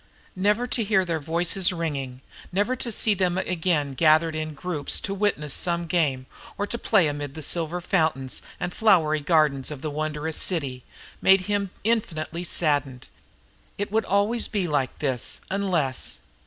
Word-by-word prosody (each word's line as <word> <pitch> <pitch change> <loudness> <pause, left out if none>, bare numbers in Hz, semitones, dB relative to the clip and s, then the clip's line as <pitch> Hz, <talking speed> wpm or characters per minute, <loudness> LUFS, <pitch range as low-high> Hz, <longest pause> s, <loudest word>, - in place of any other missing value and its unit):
Never 210 +5 +2
to 245 -1 0
hear 200 -3 +2
their 165 -2 -1
voices 175 +5 +2
ringing, 140 -7 -4 0.3
never 205 +7 +1
to 240 - -3
see 215 0 +3
them 185 -2 0
again 165 -6 0
gathered 160 +2 +4
in 155 -1 -4
groups 155 -2 -1
to 195 - -3
witness 190 -8 0
some 170 -1 +1
game 150 -7 0 0.3
or 205 - -1
to 235 +3 -4
play 195 -9 +3
amid 145 -1 -4
the 155 - -6
silver 170 +3 -1
fountains 160 -7 0 0.2
and 175 0 -3
flowery 165 -8 +3
gardens 145 -3 +2
of 150 -2 -8
the 155 - -2
wondrous 155 +1 -3
city, 140 -8 -1 0.4
made 190 0 +6
him 200 +1 -1
infinitely 175 -7 -1
saddened. 145 -7 0 0.7
It 205 0 -3
would 220 +1 +1
always 205 +4 +1
be 200 -4 -1
like 145 -4 -1
this, 130 -5 -1
unless.... 180 -10 -1
165 Hz, 155 wpm, -25 LUFS, 150-195 Hz, 0.7 s, made